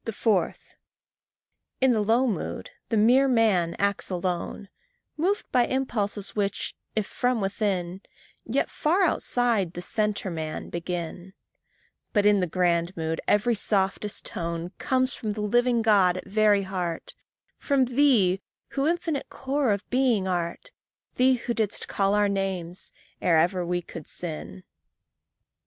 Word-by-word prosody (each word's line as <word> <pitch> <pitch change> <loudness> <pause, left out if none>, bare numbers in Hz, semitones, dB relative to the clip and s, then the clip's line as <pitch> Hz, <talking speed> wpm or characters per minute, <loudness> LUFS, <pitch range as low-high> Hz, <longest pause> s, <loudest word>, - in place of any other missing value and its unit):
4. 200 -4 +1 1.2
In 265 -1 +4
the 220 -3 +2
low 230 +5 +3
mood, 210 -10 -3 0.2
the 225 - +1
mere 250 +6 +5
man 215 -9 +2
acts 200 0 0
alone, 180 +2 -3 0.5
Moved 380 +7 0
by 245 -2 +3
impulses 215 -6 -2
which, 200 -1 -2 0.2
if 215 -2 0
from 245 +3 0
within, 195 -2 -2 0.4
Yet 250 +5 -1
far 350 +6 +2
outside 235 - +1
the 175 - -6
centre 210 -2 -1
man 160 -2 -5
begin; 175 +1 -5 0.8
But 205 -2 +3
in 205 -1 +5
the 180 - 0
grand 170 0 0
mood, 160 0 -2
every 210 +4 +3
softest 200 -1 0
tone 170 +1 -3
Comes 260 0 +1
from 215 -3 -3
the 210 - -5
living 240 +2 +2
God 195 -5 +4
at - - -7
very 205 0 +3
heart 180 -3 -4 0.5
From 275 -3 +2
thee 240 -8 +3 0.3
who 275 +1 -1
infinite 330 -3 -1
core 270 -2 -1
of 200 -1 -2
being 245 -7 +2
art, 175 - -3 0.5
Thee 255 +1 +5
who 240 0 -3
didst 220 -3 -1
call 195 0 +1
our 210 0 +3
names 190 -3 -3 0.3
ere 170 -3 +4
ever 180 +3 +2
we 175 0 -2
could 165 -2 -9
sin. 95 - -6
205 Hz, 140 wpm, -26 LUFS, 180-240 Hz, 1.2 s, mere